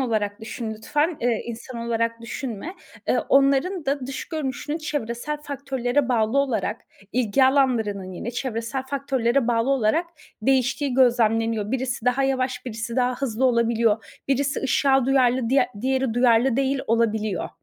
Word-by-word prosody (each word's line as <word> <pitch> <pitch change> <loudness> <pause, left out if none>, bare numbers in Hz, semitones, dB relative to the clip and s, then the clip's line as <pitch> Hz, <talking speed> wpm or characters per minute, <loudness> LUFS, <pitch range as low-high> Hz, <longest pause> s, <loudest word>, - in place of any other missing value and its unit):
olarak 215 -4 -1
düşün 225 0 -5
lütfen, 295 +9 -1
eee, 235 -2 0
insan 235 +1 -7
olarak 230 0 -1
düşünme. 240 - -6 0.3
Eee, - - +3
onların 280 +6 +3
da 275 -2 -1
dış 270 - -5
görünüşünün 295 0 -3
çevresel 295 -2 -3
faktörlere 270 -2 -1
bağlı 230 +1 +2
olarak 245 -5 0 0.3
ilgi 255 +2 +3
alanlarının 225 -8 +1
yine 215 +6 -5
çevresel 245 +1 -3
faktörlere 265 -2 0
bağlı 235 +2 +2
olarak 275 +6 +2 0.4
değiştiği 265 +2 +1
gözlemleniyor. 225 -4 +2
Birisi 255 -2 -2
daha 250 +2 +2
yavaş, 260 -1 -1
birisi 230 0 -5
daha 250 0 +2
hızlı 260 -2 -2
olabiliyor. 230 -3 +1
Birisi 280 +2 +1
ışığa 270 -1 +2
duyarlı, 255 -3 +3
diğer 265 +1 +3
diğeri 260 -1 0
duyarlı 245 0 +4
değil 275 0 +1
olabiliyor. 220 -3 0
250 Hz, 135 wpm, -24 LUFS, 230-270 Hz, 0.4 s, duyarlı